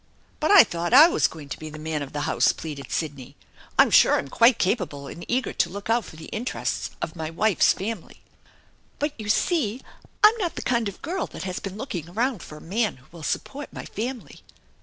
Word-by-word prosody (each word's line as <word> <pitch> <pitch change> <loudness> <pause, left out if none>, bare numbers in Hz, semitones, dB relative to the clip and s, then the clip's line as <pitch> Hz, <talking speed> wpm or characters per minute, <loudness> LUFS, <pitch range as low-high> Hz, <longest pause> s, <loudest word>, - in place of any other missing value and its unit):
" - - -35
But 310 - 0
I 405 -3 +10
thought 175 +7 -1
I 305 +4 +10
was - - +2
going 155 -3 -11
to - - -6
be 155 - -7
the 155 - -9
man 155 -1 -3
of 140 - -6
the 145 - -3
house,^ 160 +2 +2
pleaded 145 -4 -7
Sidney. 140 -5 -4 0.4
"I'm - - +6
sure - - +6
I'm 140 - -4
quite 230 - +5
capable 180 - -1
and 170 +5 -8
eager 250 +1 -1
to 170 - +1
look 200 +4 -4
out 230 -3 +2
for - - -12
the 160 - -10
interests 235 +4 -3
of 160 - -4
my 160 -2 -4
wife's 195 +4 +3
family." 200 -2 -5 0.8
"But 295 0 -1
you 210 -1 -5
see 250 - +1 0.4
I'm 425 +2 +8
not 360 -6 -2
the - - -5
kind 235 -4 +1
of 195 - -10
a - - -24
girl 355 0 -3
that - - -8
has 185 -1 -4
been 195 0 -7
looking 180 - -5
around 230 +2 -1
for 150 - -10
a - - -13
man 210 - -1
who 130 - -21
will 170 -1 -12
support 280 - -4
my - - -8
family." 240 +3 -6
195 Hz, 225 wpm, -25 LUFS, 160-245 Hz, 0.8 s, I